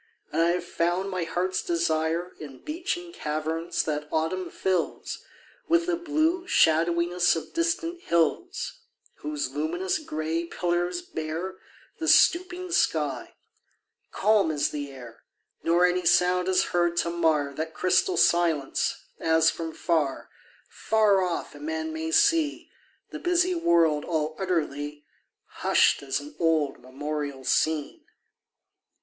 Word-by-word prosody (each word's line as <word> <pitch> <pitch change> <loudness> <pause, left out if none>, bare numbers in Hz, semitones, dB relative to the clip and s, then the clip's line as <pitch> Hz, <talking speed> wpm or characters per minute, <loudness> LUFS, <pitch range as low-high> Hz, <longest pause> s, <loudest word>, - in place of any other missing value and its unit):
And 160 - +1
I 165 - +4
have 180 - -3
found 175 +3 -1
my 180 -2 -2
heart's 185 +2 -1
desire 165 +1 0
In 140 -4 -10
beechen 345 +2 -4
caverns 160 - -2
that 150 -1 -3
autumn 165 +4 -1
fills 185 -3 -2 0.4
With 335 0 +3
the 355 -1 +1
blue 335 +2 0
shadowiness 170 - +3
of 165 - -6
distant 335 +1 -1
hills; 355 - -1 0.4
Whose 300 -1 -3
luminous 170 - -1
grey 160 - -3
pillars 175 +1 -1
bear 165 +3 -5 0.4
The 320 - -3
stooping 360 +2 +3
sky: 150 - 0 0.8
calm 210 -3 +3
is 150 -2 0
the 145 -1 -4
air, 125 -4 -12 0.4
Nor 170 +2 +3
any 180 -1 +1
sound 180 +1 +3
is 185 -1 +3
heard 175 -1 +1
to 170 - +1
mar 155 -4 +1
That 160 +2 -5
crystal 365 - +2
silence 165 -5 +2 0.2
as 160 0 +3
from 165 -1 -5
far, 155 -5 -1 0.4
Far 215 -3 +2
off 180 -2 -3
a - - -12
man 320 +1 -3
may 320 0 -3
see 330 -5 +2 0.4
The - - -6
busy 355 +1 +2
world 170 - +3
all 155 -2 -2
utterly 150 -5 -2 0.4
Hushed - - +2
as 135 0 -2
an 145 +1 -10
old 160 -4 +1
memorial 140 +1 -5
scene. 155 +2 0
170 Hz, 130 wpm, -26 LUFS, 155-220 Hz, 0.8 s, I